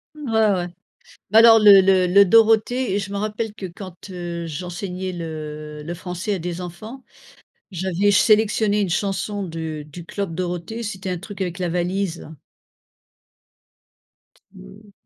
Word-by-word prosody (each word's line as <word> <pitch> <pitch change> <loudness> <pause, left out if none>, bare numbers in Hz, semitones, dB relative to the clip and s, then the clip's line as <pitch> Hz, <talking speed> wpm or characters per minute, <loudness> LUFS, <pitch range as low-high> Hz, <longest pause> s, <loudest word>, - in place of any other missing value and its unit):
Ouais, 290 -6 -6 0.2
ouais. 175 -1 -2 0.6
Bah 220 - +6
alors 225 0 +8
le 205 -2 +8
le 190 -1 +3
le 200 +3 +6
Dorothée 225 +1 +3
je 195 0 -5
me 200 - -4
rappelle 215 +1 -3
que 200 - -9
quand 185 +1 -11
heu, 170 -2 -5
j'enseignais 180 +3 -5
le 155 -2 -7
le 170 +3 -5
français 180 +3 -4
à - - -3
des 175 +1 -5
enfants, 215 +9 -9 0.7
j'avais 190 +2 0
sélectionné 210 0 +3
une 195 - 0
chanson 200 +2 -2
du 160 -3 -5
du 165 +3 -11
Club 195 -5 -4
Dorothée. 180 +5 -4
C'était 195 -3 -5
un 180 - -2
truc 200 0 -7
avec 180 0 -4
la 180 -1 -2
valise, 180 +1 -2
là. 160 - -11 2.2
Mmh. - - -15
185 Hz, 145 wpm, -21 LUFS, 175-205 Hz, 2.2 s, alors